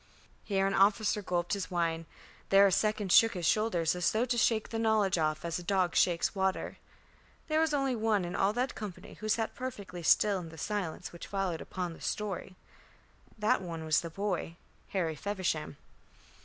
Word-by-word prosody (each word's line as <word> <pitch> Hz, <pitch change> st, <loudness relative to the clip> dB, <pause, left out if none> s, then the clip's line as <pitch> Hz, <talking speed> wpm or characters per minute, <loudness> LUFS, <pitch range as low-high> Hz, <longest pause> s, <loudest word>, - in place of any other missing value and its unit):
Here 195 Hz, -2 st, 0 dB
an 195 Hz, -, +1 dB
officer 210 Hz, +2 st, +3 dB
gulped 175 Hz, -2 st, -1 dB
his 195 Hz, -5 st, -3 dB
wine, 165 Hz, -2 st, -1 dB, 0.4 s
there 195 Hz, +1 st, +7 dB
a 195 Hz, -, +4 dB
second 210 Hz, -1 st, +1 dB
shook 225 Hz, +2 st, +6 dB
his 175 Hz, -2 st, -3 dB
shoulders 180 Hz, -5 st, +2 dB
as 180 Hz, -1 st, +1 dB
though 225 Hz, +3 st, +1 dB
to 250 Hz, -1 st, -1 dB
shake 225 Hz, -1 st, +2 dB
the 225 Hz, -, -3 dB
knowledge 215 Hz, -5 st, +2 dB
off 155 Hz, +1 st, -1 dB
as 170 Hz, 0 st, -2 dB
a -, -, -8 dB
dog 185 Hz, -1 st, +1 dB
shakes 170 Hz, -2 st, +2 dB
water. 190 Hz, -1 st, -1 dB, 0.7 s
There 310 Hz, 0 st, +2 dB
was 320 Hz, -1 st, +2 dB
only 275 Hz, -3 st, +1 dB
one 215 Hz, -4 st, +1 dB
in 175 Hz, -, -5 dB
all 195 Hz, +1 st, +2 dB
that 250 Hz, +3 st, -1 dB
company 205 Hz, -5 st, -8 dB
who 215 Hz, -, -4 dB
sat 225 Hz, 0 st, 0 dB
perfectly 205 Hz, -8 st, -6 dB
still 200 Hz, +4 st, +4 dB
in 170 Hz, -2 st, -8 dB
the 160 Hz, -, -12 dB
silence 195 Hz, 0 st, -3 dB
which 170 Hz, -, -9 dB
followed 195 Hz, -5 st, -2 dB
upon 180 Hz, -2 st, -4 dB
the -, -, -14 dB
story. 195 Hz, -3 st, -3 dB, 0.8 s
That 210 Hz, -2 st, +2 dB
one 165 Hz, -3 st, -6 dB
was 155 Hz, -1 st, +3 dB
the 170 Hz, -, -6 dB
boy, 185 Hz, -2 st, -3 dB, 0.3 s
Harry 170 Hz, -5 st, -1 dB
Feversham. 175 Hz, -5 st, -3 dB
195 Hz, 185 wpm, -31 LUFS, 175-215 Hz, 0.8 s, there